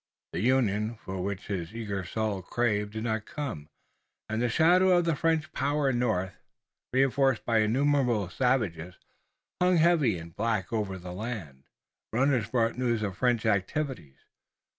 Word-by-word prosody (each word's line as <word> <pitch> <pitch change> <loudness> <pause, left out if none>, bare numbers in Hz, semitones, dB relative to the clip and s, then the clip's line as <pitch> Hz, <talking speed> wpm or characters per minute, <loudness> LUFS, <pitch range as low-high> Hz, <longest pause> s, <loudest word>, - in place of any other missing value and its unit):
The - - -2
union 110 -2 +1
for 95 -3 -6
which 100 +1 -4
his 95 0 -4
eager 100 -4 -3
soul 105 +1 -2
craved 105 0 -1
did 110 0 -4
not 110 -2 -2
come, 120 - -5 0.6
and 110 +1 -2
the 120 - +1
shadow 180 +7 +5
of 175 - +2
the 165 -2 +1
French 160 +2 0
power 140 +1 +1
in 120 - -1
the 125 - +2
north, 95 -4 -1 0.6
reinforced 135 -1 +2
by 115 -2 +3
innumerable 125 -2 +2
savages, 95 -9 0 0.7
hung 180 0 +4
heavy 155 - +3
and 80 0 -10
black 110 -2 -1
over 105 -4 -1
the 90 0 -8
land. 90 - -6 0.5
Every 130 +5 +2
runner 120 -6 +1
brought 115 0 0
news 120 -3 0
of 100 -3 -3
French 120 0 +1
activities. 105 - -1
115 Hz, 160 wpm, -28 LUFS, 100-135 Hz, 0.7 s, shadow